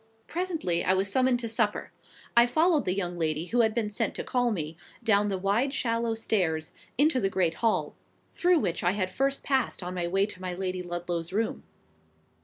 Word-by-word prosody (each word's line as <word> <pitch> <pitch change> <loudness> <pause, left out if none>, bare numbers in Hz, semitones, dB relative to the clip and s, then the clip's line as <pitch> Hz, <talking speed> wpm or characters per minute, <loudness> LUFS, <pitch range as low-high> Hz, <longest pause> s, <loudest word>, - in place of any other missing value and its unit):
Presently 325 - -1
I 185 - +3
was 195 +1 +1
summoned 255 +1 +3
to 230 - -3
supper. 220 -2 0 0.4
I 235 +1 +7
followed 310 +4 +3
the 185 - 0
young 175 -3 -3
lady 155 0 0
who 240 +6 +2
had 220 -1 +1
been 215 -3 -1
sent 205 - -1
to - - -4
call 245 -1 +1
me, 165 -7 -3 0.3
down 205 -2 +3
the 195 -2 -1
wide 205 +9 +1
shallow 230 -3 0
stairs, 175 -8 0 0.3
into 290 0 +4
the 195 - +1
great 180 -4 +1
hall, 225 -2 +1 0.4
through 355 0 +3
which 180 - -1
I 175 +1 +3
had 185 -2 -1
first 275 +5 -1
passed 265 -8 0
on 180 +1 -4
my 175 -1 -2
way 195 +3 +2
to 205 -3 -7
my 180 -1 -4
Lady 185 0 -3
Ludlow's 175 -1 -4
room. 220 +3 -1
205 Hz, 200 wpm, -28 LUFS, 180-240 Hz, 0.4 s, I